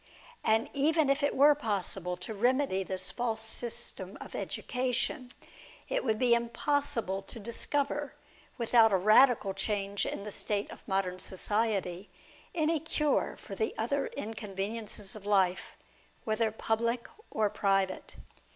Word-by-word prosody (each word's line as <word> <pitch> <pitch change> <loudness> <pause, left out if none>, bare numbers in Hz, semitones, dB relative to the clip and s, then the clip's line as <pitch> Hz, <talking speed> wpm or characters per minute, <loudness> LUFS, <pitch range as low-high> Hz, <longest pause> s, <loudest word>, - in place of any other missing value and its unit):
And 220 +1 +3
even 300 +1 +3
if 275 +2 +1
it 285 - +1
were 290 +2 +7
possible 195 - -2
to 180 +5 -6
remedy 245 -1 +2
this 185 0 -4
false 235 -2 -1
system 225 +1 -1
of - - -9
education, 255 +2 -1
it - - -16
2IO - - -21
DIALOGUE - - -20
BETWEEN - - -1
would 220 -1 +2
be 245 0 +4
impossible 235 -4 0
to 225 +4 -6
discover, 280 +6 -1 0.4
without 230 -2 +5
a 195 - +4
radical 215 +1 +5
change 200 -1 -1
in - - -4
the 210 - -6
state 205 0 -2
of - - -11
modern 190 -2 -1
society, 195 -1 -1 0.5
any 320 -1 +2
cure 300 -1 0
for - - -9
the 440 - -1
other - - 0
inconveniences 210 - -4
of 205 -1 -9
life, 190 -3 +2 0.5
whether 220 0 +1
public 230 +2 -1 0.2
or 215 -1 +1
private. 195 -2 0
220 Hz, 140 wpm, -31 LUFS, 195-255 Hz, 0.5 s, were